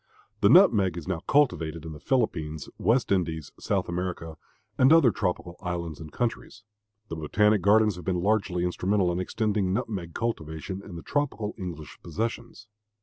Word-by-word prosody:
The 100 - +4
nutmeg 105 - +5
is 85 - -7
now 95 -3 -1
cultivated 85 - +1
in 80 - -6
the 75 - -10
Philippines, 80 - -1
West 120 0 +2
Indies, 80 -6 -1
South - - -1
America, 85 -2 -4 0.4
and 130 +3 +5
other 160 -7 +6
tropical 90 -3 -3
islands 85 -4 -4
and 80 -1 -9
countries. 115 -2 -3 0.5
The - - -4
botanic 105 +6 +2
gardens 105 -1 +4
have 90 - -9
been 90 -2 0
largely 100 -4 +1
instrumental 90 +1 +1
in 85 - -2
extending 100 0 0
nutmeg 95 -5 -3
cultivation 95 -4 -4
in 100 - -10
the 85 - -8
tropical 135 -8 -2
English 85 -7 -8
possessions. 115 +5 -5
95 Hz, 155 wpm, -27 LUFS, 85-110 Hz, 0.5 s, other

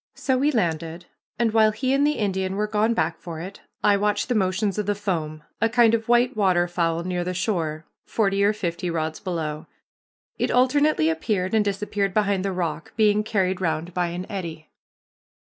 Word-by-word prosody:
So 265 - 0
we 280 +4 +2
landed, 170 - -2 0.3
and 225 -1 +1
while 220 -1 +5
he 255 +5 -1
and 280 +2 +3
the 300 - +2
Indian 190 -2 -1
were 210 +1 0
gone 215 +2 +1
back 165 -6 -1
for 165 -2 -7
it, 190 +4 -8 0.2
I 205 -1 +5
watched 205 +3 0
the - - +2
motions 195 0 0
of 210 - -2
the 205 - +1
foam, 160 -7 -3 0.2
a 225 - +3
kind 235 -1 +4
of 225 0 -1
white 240 +1 +3
waterfowl 175 -4 +1
near 180 0 -2
the 180 +1 -3
shore, 165 -5 -2 0.2
forty 200 -2 +1
or 205 - +4
fifty 180 -4 -3
rods 160 -1 -2
below. 160 -5 -4 0.7
It - - +1
alternately 260 - +3
appeared 185 +3 -1
and 220 -1 +4
disappeared 200 -1 -2
behind 200 -3 +1
the 195 - -1
rock, 165 -4 -3
being 210 -1 +3
carried 190 -4 0
round 165 0 -2
by 180 -1 0
an 175 +2 -5
eddy. 165 -5 -6
195 Hz, 185 wpm, -24 LUFS, 170-215 Hz, 0.7 s, while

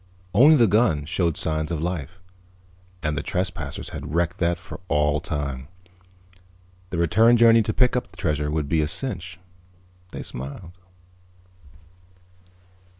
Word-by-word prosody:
Only 150 +5 +7
the 120 -5 +5
gun 95 -8 +2
showed 85 0 0
signs 80 0 -2
of 85 - -2
life... 85 0 -4 0.9
and 75 -1 -1
the - - -2
trespassers 90 0 -3
had 75 - -6
wrecked 85 +2 0
that 85 0 +1
for - - -10
all 75 +1 +2
time. 70 -3 -4 1.2
The 85 - -4
return 110 +9 +4
journey 115 0 +6
to 110 - -1
pick 125 +3 +2
up 125 - -1
the - - -20
treasure 75 -2 -1
would 75 -1 -1
be 80 +1 +2
a 75 - 0
cinch... 95 - -4 0.7
they - - -7
smiled. 70 +7 -8
85 Hz, 140 wpm, -24 LUFS, 75-100 Hz, 1.2 s, Only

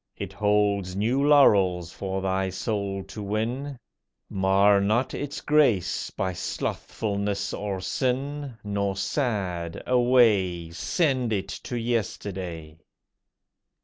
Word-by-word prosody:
It - - -6
holds 105 -3 +1
new 120 +7 +1
laurels 95 - +4
for 95 -1 -4
thy 95 0 0
soul 100 0 -3
to 100 +3 -9
win; 120 +7 -2 0.5
Mar 100 +1 +4
not 110 +6 +1
its 145 -1 -4
grace 120 - +2
by 95 -1 -2
slothfulness 100 +2 -3
or 100 -2 -3
sin, 135 +5 -2
Nor 100 -1 -1
sad, 95 - -2
away, 110 -9 +3
Send 130 - 0
it 100 -2 -1
to 120 - -5
yesterday. 95 -8 -3
100 Hz, 105 wpm, -26 LUFS, 95-120 Hz, 0.5 s, laurels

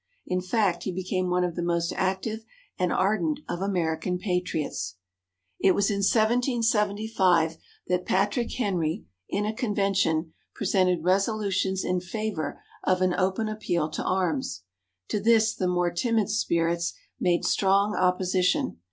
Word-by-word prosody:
In 180 0 -1
fact, 185 -1 +1
he 190 - -3
became 185 0 -2
one 180 0 +2
of 175 -2 -2
the 175 - -2
most 170 0 0
active 190 +4 -1 0.4
and 180 -1 +1
ardent 270 - +1
of 175 - -4
American 180 -2 -1
Patriots. 180 - -2 0.6
It 190 - +4
was 200 +1 +2
in 200 - -1
1775 210 - +2 0.3
that 180 0 0
Patrick 205 +5 +1
Henry, 185 -6 -1 0.2
in 205 +1 -1
a 215 - -1
convention, 195 -8 0 0.2
presented 185 -4 +1
resolutions 195 0 +1
in 180 0 +1
favour 180 -5 -4 0.2
of 185 0 +2
an 185 -1 +2
open 190 +4 0
appeal 175 -7 -1
to - - -3
arms. 150 - -1 0.5
To 210 - 0
this 225 +1 +4
the 185 - -1
more 175 -1 +1
timid 220 +3 0
spirits 170 -4 0 0.2
made 175 -1 +1
strong 200 +1 +3
opposition. 180 - +1
185 Hz, 135 wpm, -26 LUFS, 175-210 Hz, 0.6 s, It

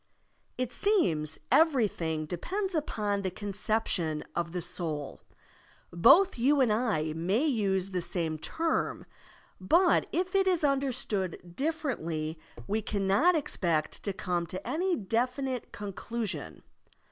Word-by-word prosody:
It 250 -1 -2
seems, 160 - +1
everything 205 - +2
depends 375 - -3
upon 210 -10 -1
the 190 - -1
con 200 +2 -6
ception 185 -7 0
of 170 -1 -1
the 175 -1 -3
soul. 160 -5 -4 0.7
Both 275 - +6
you 280 +4 +4
and 245 -5 +4
I 205 -10 0
may 190 - +1
use 195 - 0
the 180 -1 -1
same 165 -3 -2
term, 325 - -1 0.5
but 340 - +4
if 365 +1 -1
it 390 -1 +3
is 360 -4 +2
tmderstood 230 - -1
differently 170 - -2 0.3
we 215 - -1
cannot 205 - +2
expect 170 - -1
to 200 - -2
come 175 -2 -2
to 185 +3 -6
any 360 +3 +1
definite 250 - -2
conclu 210 +3 -4
sion. 145 - -6
205 Hz, 125 wpm, -29 LUFS, 170-280 Hz, 0.7 s, Both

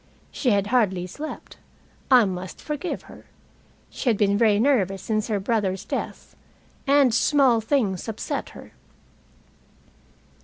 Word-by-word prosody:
She 260 - -1
had 200 -3 +2
hardly 190 -7 +2
slept. 295 - -8 0.5
I 250 -4 +7
must 185 -1 -5
forgive 300 +4 -4
her. - - -15 0.6
She 260 - -2
had 220 - +2
been 200 -1 +2
very 210 -1 +3
nervous 205 -8 +1
since 215 -1 -1
her 210 -3 -1
brother's 195 -2 -1
death, - - -5 0.5
and 275 -3 +4
small 255 -1 +3
things 220 -6 0
upset 220 -1 -4
her. - - -13
220 Hz, 125 wpm, -24 LUFS, 195-260 Hz, 0.6 s, I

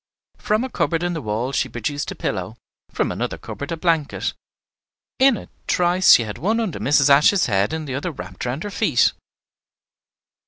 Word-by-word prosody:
From 215 +3 0
a 260 - -4
cupboard 165 0 0
in 175 0 -1
the 160 - -4
wall 110 +3 -2
she 130 -1 -1
produced 145 +5 -3
a - - -6
pillow, 95 +3 -4 0.3
from - - -1
another - - -3
cupboard 140 - -7
a 165 - -2
blanket; 160 -3 0 0.9
in 265 -3 +5
a - - -10 0.2
trice 180 +1 +4
she 120 - +5
had 105 -2 -7
one 220 +7 0
under 215 -9 -3
Mrs. 140 0 +3
Ashe's 150 +8 +5
head 100 -2 +1
and 160 -1 -4
the 130 - -4
other 140 +7 -3
wrapped 95 - -8
round 125 +6 -3
her 205 - -5
feet. 165 - +2
150 Hz, 185 wpm, -21 LUFS, 125-180 Hz, 0.9 s, in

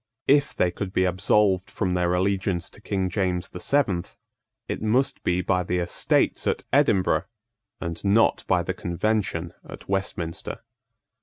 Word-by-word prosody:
If 145 +1 +3
they 90 - +2
could 95 +1 -5
be 95 - +2
absolved 95 +1 +2
from 95 -4 -1
their 90 0 +1
allegiance 95 -1 0
to - - -15
King 95 -3 -1
James 90 -1 -1
the 90 - -8
Seventh, 100 -12 0 0.5
it - - -4
must 120 +5 +1
be 90 +1 +1
by 90 0 +1
the 90 0 -1
Estates 85 -1 +1
at - - 0
Edinburgh, 95 -2 +3 0.5
and 85 -1 -5
not 105 +3 +3
by - - +2
the - - -2
Convention 90 -2 -1
at - - -11
Westminster. 95 -4 -3
95 Hz, 150 wpm, -25 LUFS, 90-100 Hz, 0.5 s, If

